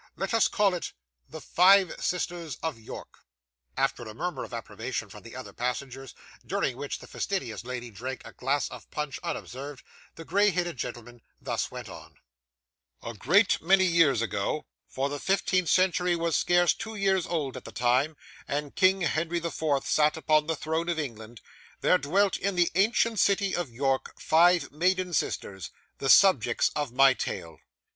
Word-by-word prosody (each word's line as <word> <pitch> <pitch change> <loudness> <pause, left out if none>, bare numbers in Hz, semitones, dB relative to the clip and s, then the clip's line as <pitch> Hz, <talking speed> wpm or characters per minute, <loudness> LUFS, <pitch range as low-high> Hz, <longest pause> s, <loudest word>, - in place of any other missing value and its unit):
Let 195 +2 -3
us 225 - +4
call 200 -2 +2
it 175 - -4 0.4
THE - - -8
FIVE 190 +1 +4
SISTERS 175 -3 -2
OF 160 -8 -3
YORK 110 - -10 0.6
After 135 -2 0
a 110 - -9
murmur 175 +6 -3
of - - -9
approbation 115 -2 -5
from - - -12
the - - -12
other - - -8
passengers, 130 +1 -4 0.3
during - - -1
which - - -5
the - - -12
fastidious - - -4
lady 120 -1 -6
drank 125 +5 -6
a - - -11
glass 140 +3 -1
of - - -11
punch 150 -3 -4
unobserved, 135 +1 -6 0.3
the 165 - -10
grey 205 +4 +3
headed 175 -4 -2
gentleman 120 0 -7 0.2
thus - - -2
went - - -8
on: - - -12 0.9
'A 115 - -5
great 175 - +3
many 190 +3 +4
years 165 -9 +3
ago 110 +7 -2 0.2
for 135 +1 -2
the 145 0 -5
fifteenth 185 -2 +1
century 180 0 +3
was 170 -1 0
scarce 175 -1 +3
two 220 0 -7
years 195 -3 +1
old 150 -6 -2
at - - -9
the - - -8
time, 130 +5 +1 0.3
and 145 0 -3
King 190 0 +4
Henry 170 +1 0
the 170 0 -3
Fourth 145 -4 -1
sat 150 +1 +3
upon 155 -1 +2
the 165 - 0
throne 160 +3 -2
of 170 - -1
England 115 -6 -6 0.4
there 180 - +4
dwelt, 195 +7 +1
in 200 -1 -2
the 175 -1 +2
ancient 220 +3 +2
city 200 0 +2
of 175 -5 -2
York, 135 +2 -2
five 175 +2 +4
maiden 180 +3 0
sisters, 95 - -2 0.3
the 135 - -2
subjects 130 - +5
of 145 -4 -2
my 135 +1 +6
tale. 85 - -5
160 Hz, 170 wpm, -27 LUFS, 130-180 Hz, 0.9 s, my